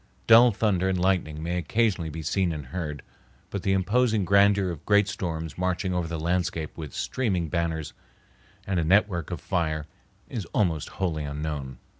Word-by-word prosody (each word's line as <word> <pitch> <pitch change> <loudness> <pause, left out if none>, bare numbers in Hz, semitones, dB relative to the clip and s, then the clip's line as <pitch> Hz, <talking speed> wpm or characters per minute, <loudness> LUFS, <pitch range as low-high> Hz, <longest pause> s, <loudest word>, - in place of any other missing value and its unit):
Dull 115 +2 +8
thunder 100 -3 +1
and 95 -1 0
lightning 90 -5 0
may 90 +2 -1
occasionally 95 -1 0
be 80 +1 -6
seen 90 +2 +1
and 75 -3 -5
heard, 75 -1 -5 0.5
but 100 - -3
the 95 0 +1
imposing 110 +2 +2
grandeur 100 0 +4
of 80 - -8
great 105 -1 +4
storms 80 -5 -4
marching 90 +1 0
over 90 -2 -1
the 85 -1 -4
landscape 85 -1 -1
with 75 -5 -7
streaming 95 -10 -1
banners 80 -3 -2 0.7
and 95 -3 0
a - - +1
network 90 -1 +2
of 90 -3 -4
fire 80 -5 -1 0.4
is 110 -6 -5
almost 85 -7 +1
wholly 85 -5 -1
unknown. 70 -3 -4
90 Hz, 165 wpm, -26 LUFS, 80-100 Hz, 0.7 s, Dull